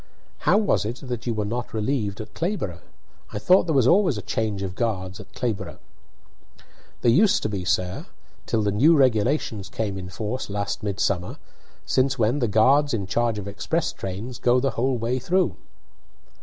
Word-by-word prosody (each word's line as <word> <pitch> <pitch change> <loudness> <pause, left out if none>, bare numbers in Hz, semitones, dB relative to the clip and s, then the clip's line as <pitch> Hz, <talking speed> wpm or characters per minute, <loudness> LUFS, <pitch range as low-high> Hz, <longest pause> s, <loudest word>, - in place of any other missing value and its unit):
"How - - +6
was 210 -1 +2
it 110 +3 -3
that 125 -1 -4
you 115 - 0
were 105 -1 -1
not 115 +2 -4
relieved 105 -2 -1
at 110 -1 -8
Clayborough? 160 - -3 0.5
I - - -3
thought 180 - +4
there 160 - +1
was 130 -4 +4
always 175 - +4
a 105 - -5
change 105 -3 -2
of 95 -2 -4
guards 95 -4 -2
at 95 -2 -12
Clayborough." 115 -3 -3 1.2
"There 120 - +4
used 195 - +4
to - - 0
be, 100 -3 -3
sir, 90 +1 -1 0.4
till 110 -2 +1
the 100 - +1
new 150 +11 +5
regulations 120 -4 +1
came 100 -4 -3
in 90 0 -7
force 110 +7 -4
last 100 0 -3
midsummer, 100 -3 -1 0.5
since 135 +1 +1
when 120 +4 +2
the 120 - +1
guards 135 +7 +4
in 100 -3 -3
charge 115 +3 0
of 100 -1 -5
express 100 -1 -2
trains 105 +6 -6
go 125 +1 +3
the 135 +1 0
whole 125 +3 0
way 120 +3 -1
through." 180 +7 +1
110 Hz, 180 wpm, -24 LUFS, 100-130 Hz, 1.2 s, How